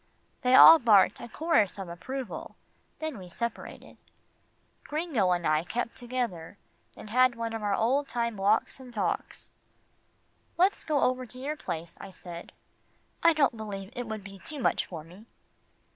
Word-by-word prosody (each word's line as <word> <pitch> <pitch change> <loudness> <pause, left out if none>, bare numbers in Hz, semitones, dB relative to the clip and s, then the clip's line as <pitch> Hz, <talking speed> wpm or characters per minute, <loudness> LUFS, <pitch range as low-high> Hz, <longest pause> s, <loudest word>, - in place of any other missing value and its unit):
They 255 0 +4
all 325 - +11
barked 210 -7 +4
a 240 - -8
chorus 225 - +1
of 195 -2 -6
approval, 245 +10 -6 0.4
then 315 -8 -5
we 180 -1 -10
separated. 235 +6 -6 0.9
Gringo 295 - 0
and 175 -1 0
I 155 +1 +2
kept 235 +5 -3
together, 240 -9 -4 0.4
and 210 - -10
had 255 +1 +4
one 230 -1 -4
of 225 - -4
our 205 -1 0
old 270 +7 +1
time 235 -3 -2
walks 205 +6 +1
and 255 -2 -11
talks. 200 -7 -3 1.1
"Let's 375 +3 +2
go 300 -3 0
over 255 0 0
to 250 - -12
your 280 +4 -3
place," 170 - -6
I - - -8
said. 175 -2 -10 0.7
"I 335 0 +6
don't 280 -6 +2
believe 205 -1 -7
it 245 -2 -4
would 215 -2 -5
be 195 -1 -11
too 300 +6 -7
much - - +1
for 165 -4 -8
me." 180 +8 -15
230 Hz, 160 wpm, -28 LUFS, 195-255 Hz, 1.1 s, all